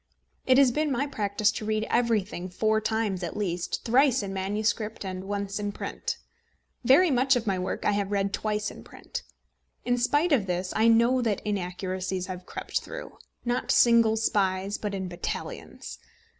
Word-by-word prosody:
It 260 0 +6
has 270 -2 +6
been 300 +3 0
my 270 +2 +1
practice 210 -5 0
to - - -6
read 215 0 0
everything 210 -6 0
four 215 +4 +1
times 220 -4 -1
at 175 +1 -4
least 175 -4 -2
thrice 255 0 +4
in 195 -1 -4
manuscript 210 +3 -1
and 185 0 -5
once 200 0 -3
in 205 0 -2
print. - - -4 0.7
Very 290 +8 +6
much 265 +1 +3
of 240 -2 -1
my 195 -3 0
work 180 - -3
I - - +4
have 200 -1 -1
read 200 -1 0
twice 210 0 -1
in - - -12
print. - - -8 0.6
In 245 0 +1
spite 295 +7 +2
of 230 -9 +3
this 180 +1 -2
I 220 +1 +4
know 235 +3 +4
that 220 -5 -1
inaccuracies 185 -1 -2
have 180 -1 -7
crept - - -3
through, - - -8 0.3
not 245 +1 -1
single 230 -2 +5
spies, 195 -2 0
but 205 -2 -3
in 190 -1 -3
battalions. 175 -1 -6
210 Hz, 170 wpm, -27 LUFS, 190-235 Hz, 0.7 s, It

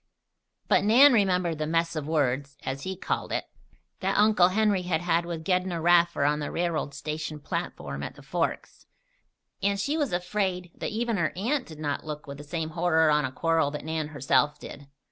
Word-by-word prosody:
But - - +3
Nan 250 +7 +7
remembered 180 -6 +2
the 155 - -1
"mess 165 +1 0
of 150 -2 -3
words" 140 -2 0
(as 135 +1 -3
he 190 +5 -4
called 185 - -3
it) - - -1 0.5
that 195 +1 0
Uncle 210 -4 +5
Henry 205 0 +2
had 175 -2 -1
had 170 0 +1
with 165 -2 -5
Gedney 180 -1 +1
Raffer 170 -2 +3
on 150 +1 +2
the 145 - -3
railroad 165 -5 -2
station 150 +1 -5
platform 70 - -4
at - - -6
the 145 - -14
Forks, 165 +5 -3 0.7
and 200 0 +1
she 285 +10 0
was 290 -4 0
afraid 180 0 -2
that - - -4
even 230 0 -1
her 170 -4 +1
aunt 245 +8 -1
did 155 - -10
not 145 -2 -3
look 150 -1 -6
with 140 0 -8
the - - -8
same 160 +1 -4
horror 160 -2 +3
on 150 -1 +3
a 130 - -4
quarrel 165 +1 +1
that 150 0 -6
Nan 160 -1 -2
herself 145 0 +1
did. 140 -1 -10
165 Hz, 195 wpm, -27 LUFS, 150-185 Hz, 0.7 s, Nan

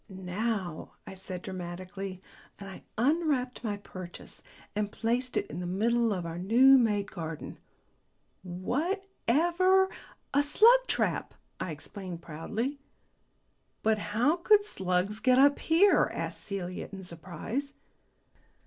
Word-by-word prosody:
"Now!" 190 -1 -3
I - - -8
said 185 -1 -8
dramatically, 185 +1 -6 0.3
and 200 - -9
I 190 - -9 0.2
unwrapped 265 -2 +1
my 210 -3 -2
purchase 185 -3 -10 0.3
and 210 -1 -1
placed 245 +3 -1
it - - 0
in 170 - -7
the 180 - -4
middle 230 +5 +2
of 180 -4 -2
our 165 +1 -5
new 255 +8 +6
made 210 -4 +1
garden. 165 -4 -6 0.8
"Whatever 350 - +1 0.2
" - - -30
"A 285 - +5
slug 445 +12 +6
trap," - - -1 0.2
I - - -3
explained 170 +2 -7
proudly. 220 - -4 1.0
"But 220 -1 +3
how 245 +11 +1
could 410 +3 +4
slugs 190 - -1
get 255 +3 +4
up 285 +2 +5
here?" 360 +5 +4
asked - - -4
Celia 185 -3 -5
in 195 -1 -8
surprise. 185 - -5
210 Hz, 125 wpm, -29 LUFS, 185-275 Hz, 1.0 s, new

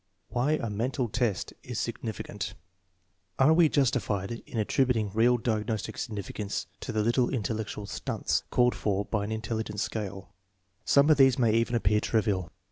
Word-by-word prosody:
Why 125 +5 +1
a 135 -7 -1
mental 120 +3 -1
test 115 -5 -1
is - - -5
significant 105 -2 -4 0.8
Are 140 +4 +5
we 165 -1 +5
justified 120 -8 +1
in 115 0 -7
attributing 110 -1 +1
real 120 +3 +4
diagnostic 110 -2 -2
significance 105 -2 -4
to - - -5
the 110 -1 0
little 120 +2 +2
intellectual 110 -3 -3
"stunts" 100 - -1
called 125 0 +3
for 100 -1 -1
by 105 -2 -1
an 105 - -5
intelligence 110 -1 -2
scale? 100 -3 -5 0.5
Some 140 +2 +5
of 150 - +5
these 135 -2 +6
may 115 -4 +3
even 115 +1 +2
appear 105 -2 +3
trivial. 105 -6 0
110 Hz, 150 wpm, -28 LUFS, 105-125 Hz, 0.8 s, these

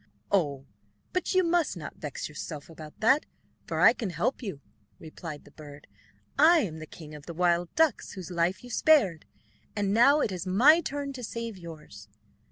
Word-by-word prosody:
"Oh, 145 -8 +1 0.6
you 370 -1 +3
must 335 - +1
not 155 - -8
vex 150 -3 -5
yourself 150 +1 -8
about 155 -1 -12
that, 265 +7 +4 0.4
for - - -2
I - - +8
can 220 -6 -4
help 250 +10 -1
you," 195 - -5 0.4
replied 155 -1 -9
the 145 - -16
bird. 145 -1 -12 0.5
"I 325 +2 +7
am 160 - -4
the 155 - -8
king 155 -1 -11
of 150 -1 -11
the 170 - -7
wild 175 0 +2
ducks, 315 -5 +1
whose 185 -2 -8
life 175 +4 0
you 245 - -10
spared, 220 - +3 0.5
and 200 -1 0
now 275 +7 +6
it 210 - 0
is 185 0 -5
my 265 - +6
turn 280 0 -4
to 255 -2 -8
save 230 -1 -5
yours." 155 - -11
185 Hz, 175 wpm, -28 LUFS, 155-255 Hz, 0.6 s, I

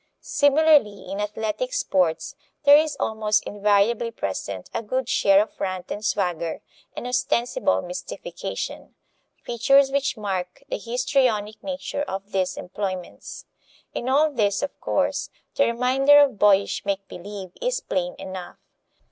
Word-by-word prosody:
Similarly 285 -10 +3
in 195 - -4
athletic 220 - -3
sports 185 - 0 0.3
there 285 0 +8
is 305 0 +2
almost 215 -1 +1
invariably 210 +3 +2
present 100 - -5
a - - -1
good 255 +3 -2
share 200 -4 +4
of 215 - -15
rant 185 -2 -3
and 210 - -4
swagger 175 -6 -1 0.4
and - - -5
ostensible 250 - 0
mystification - - -6 0.5
features 270 +3 +3
which 280 -2 0
mark 190 +2 -4
the - - -2
histrionic 240 -3 0
nature 280 0 -4
of 195 -6 -5
these 185 -2 -1
employments. 185 -1 -6 0.5
In 245 - -3
all 300 +3 +4
this, 210 -5 0
of 285 - -5
course, - - 0 0.2
the 280 - +3
reminder 260 +4 +4
of 280 -8 +4
boyish 200 -1 +3
make 200 -1 -2
believe 190 0 -8
is - - 0
plain 180 - -2
enough. 190 -2 -8
215 Hz, 130 wpm, -24 LUFS, 195-275 Hz, 0.5 s, there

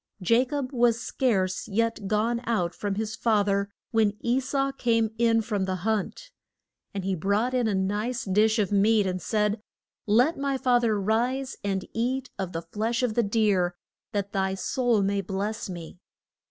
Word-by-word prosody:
Ja 230 +7 +3
cob 275 -1 -3
was 240 -3 +3
scarce 190 -9 0
yet 225 0 -1
gone 225 +3 +1
out 180 -7 0
from 200 +1 -3
his 215 +1 -3
fa 215 -3 +2
ther 200 0 0 0.2
when 215 -2 +2
E 240 +2 +1
sau 275 +1 -1
came 230 -4 +1
in 230 -1 +3
from 205 -4 -1
the 190 0 -1
hunt. 220 - -2 0.6
And 195 -2 -4
he 195 - 0
brought 200 +8 0
in 250 -3 +2
a 210 - +1
nice 210 +6 -1
dish 215 +3 +3
of 205 -3 +1
meat, 205 +1 +4
and 185 -1 -2
said, 210 0 0 0.5
Let 245 +10 +3
my 275 -1 0
fa 250 -2 +3
ther 220 -3 +1
rise 245 +6 0
and 195 -2 -1
eat 255 +3 -1
of 190 -2 -3
the 165 -1 -4
flesh 220 +8 -2
of 240 -3 +1
the 235 - +3
deer, 200 -5 +1 0.4
that 200 -1 -2
thy 190 -1 0
soul 230 +2 +1
may 200 0 +1
bless 200 +3 -3
me. 175 -1 -8
215 Hz, 180 wpm, -26 LUFS, 195-235 Hz, 0.6 s, meat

